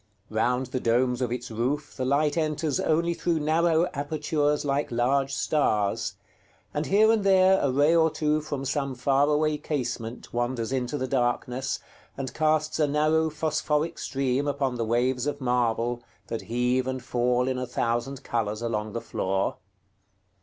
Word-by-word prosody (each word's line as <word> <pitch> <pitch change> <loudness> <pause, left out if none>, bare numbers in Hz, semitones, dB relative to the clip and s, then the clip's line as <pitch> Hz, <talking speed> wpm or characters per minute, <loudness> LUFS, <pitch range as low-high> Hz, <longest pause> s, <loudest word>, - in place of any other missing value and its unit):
Round 125 +4 +1
the 130 +1 -3
domes 125 +2 +1
of 125 -2 -1
its 125 -1 -4
roof 130 +7 -2
the 130 - -2
light 145 +3 +2
enters 155 -3 0
only 170 +2 +1
through 170 -1 0
narrow 160 +2 +2
apertures 150 0 0
like 140 +1 0
large 135 +3 +1
stars; 110 -8 0 0.6
and 150 +1 -2
here 215 +3 +5
and 220 -2 +2
there 190 -1 +5
a 140 - +1
ray 145 +5 +4
or 160 -1 +5
two 155 0 0
from 145 -3 -4
some 135 -1 -1
far 135 +3 +2
away 150 0 +1
casement 125 -6 -4
wanders 120 -1 -1
into 130 +1 -1
the 130 - -2
darkness, 125 0 -1 0.4
and 130 -1 -4
casts 155 0 +1
a 150 - +3
narrow 155 +2 +2
phosphoric 155 +1 -1
stream 135 +1 -1
upon 140 -2 0
the 120 -2 -2
waves 125 +3 +1
of 145 - -2
marble 120 -1 0 0.3
that 115 - -3
heave 125 +2 +1
and 130 -1 -3
fall 125 +1 +1
in 130 -1 -1
a 125 - -3
thousand 120 +3 -2
colors 110 -1 -2
along 110 -2 -2
the 115 - -3
floor. 95 +1 -1
135 Hz, 160 wpm, -26 LUFS, 125-150 Hz, 0.6 s, here